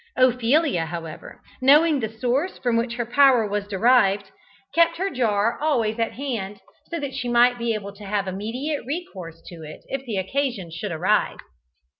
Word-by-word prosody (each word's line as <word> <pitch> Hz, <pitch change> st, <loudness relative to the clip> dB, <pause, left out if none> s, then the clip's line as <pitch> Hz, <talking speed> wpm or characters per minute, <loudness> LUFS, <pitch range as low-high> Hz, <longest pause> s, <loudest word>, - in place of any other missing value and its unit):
Ophelia, 255 Hz, -, +2 dB
however, 165 Hz, -1 st, -8 dB, 0.2 s
knowing 295 Hz, +3 st, +5 dB
the 220 Hz, -3 st, -2 dB
source 250 Hz, -, -1 dB
from 245 Hz, -2 st, 0 dB
which 235 Hz, +1 st, -1 dB
her 240 Hz, -1 st, -2 dB
power 250 Hz, -2 st, +4 dB
was 205 Hz, 0 st, -3 dB
derived, 200 Hz, -1 st, +2 dB, 0.4 s
kept 335 Hz, 0 st, +3 dB
her 385 Hz, +3 st, -1 dB
jar 230 Hz, -4 st, 0 dB
always 235 Hz, -8 st, 0 dB
at 230 Hz, -, -1 dB
hand, 220 Hz, -7 st, -4 dB, 0.3 s
so 335 Hz, -, -3 dB
that 280 Hz, -2 st, -5 dB
she 250 Hz, -3 st, -3 dB
might 240 Hz, +1 st, +4 dB
be 235 Hz, -1 st, 0 dB
able 200 Hz, -1 st, -6 dB
to 205 Hz, +1 st, -12 dB
have 200 Hz, 0 st, -1 dB
immediate 235 Hz, +11 st, -3 dB
recourse 195 Hz, -, -7 dB
to 175 Hz, -, -10 dB
it 155 Hz, -1 st, -10 dB
if 270 Hz, 0 st, -3 dB
the 215 Hz, -4 st, -2 dB
occasion 205 Hz, -3 st, -2 dB
should 175 Hz, +4 st, -5 dB
arise. 160 Hz, -, +1 dB
235 Hz, 170 wpm, -23 LUFS, 200-270 Hz, 0.4 s, knowing